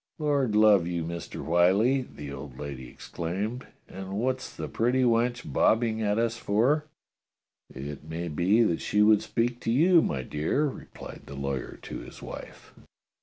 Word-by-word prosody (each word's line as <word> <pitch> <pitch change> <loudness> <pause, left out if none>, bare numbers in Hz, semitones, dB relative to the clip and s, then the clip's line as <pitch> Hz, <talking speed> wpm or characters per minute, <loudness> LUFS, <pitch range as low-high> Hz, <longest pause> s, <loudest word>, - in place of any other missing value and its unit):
"Lord 140 -8 +1
love 105 -5 +5
you. 85 -1 -2
Mister 85 +1 -6
Whyllie," 95 +10 +3
the 75 - -9
old 65 -2 -8
lady 65 -4 -7
ex - - -12
claimed, 100 +10 -3 0.2
"and 95 0 -7
what's 130 +5 -1
the - - -4
pretty 125 +3 +1
wench 120 +1 +2
bobbing 110 0 +2
at 105 0 +1
us 115 0 0
for?" 125 +10 +2 0.9
"It 70 +2 -7
may 85 +2 -4
be 90 +9 +3
that 85 -7 0
she 105 0 +2
would 105 -1 +5
speak 120 +1 -1
to 115 - -1
you, 165 +7 +5
my 65 - -2
dear," 75 - 0
replied 140 - -8
the 70 - -8
lawyer 70 -1 -4
to - - -6
his - - -11
wife. - - -10
105 Hz, 165 wpm, -27 LUFS, 85-120 Hz, 0.9 s, love